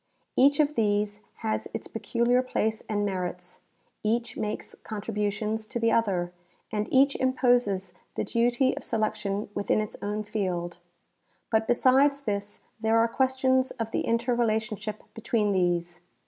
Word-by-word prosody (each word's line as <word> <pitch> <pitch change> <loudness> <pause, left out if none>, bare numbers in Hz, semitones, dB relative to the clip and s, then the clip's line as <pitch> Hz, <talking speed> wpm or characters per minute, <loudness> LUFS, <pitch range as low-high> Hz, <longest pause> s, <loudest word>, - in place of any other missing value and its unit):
Each 280 +2 +5
of 300 0 +3
these 210 -3 +1 0.3
has 220 - -1
its - - -5
pecuUar 240 +1 +1
place 220 -3 0
and 205 -1 0
merits, 180 -2 -4 0.4
each 230 +2 0
makes 210 0 -4
contributions 215 0 -2
to 235 - -3
the 230 0 +3
other, 185 -6 +1 0.4
and 210 -1 -2
each 275 +1 +5
imposes 245 -8 +2 0.2
the - - -1
duty 240 +3 +2
of - - -7
selection 210 -2 -1
within 205 +1 +1
its 215 0 -3
own 210 +1 -2
field. 180 -5 -3 0.7
But 220 0 +2
besides 270 +3 +4
this 205 -4 -3 0.2
there 220 +1 +2
are 230 0 +4
questions 260 +1 +2
of 225 -1 -2
the - - 0
inter 235 +2 +1
relationship 220 -2 -1
between 220 -2 0
these. 175 -2 0
220 Hz, 140 wpm, -27 LUFS, 205-240 Hz, 0.7 s, Each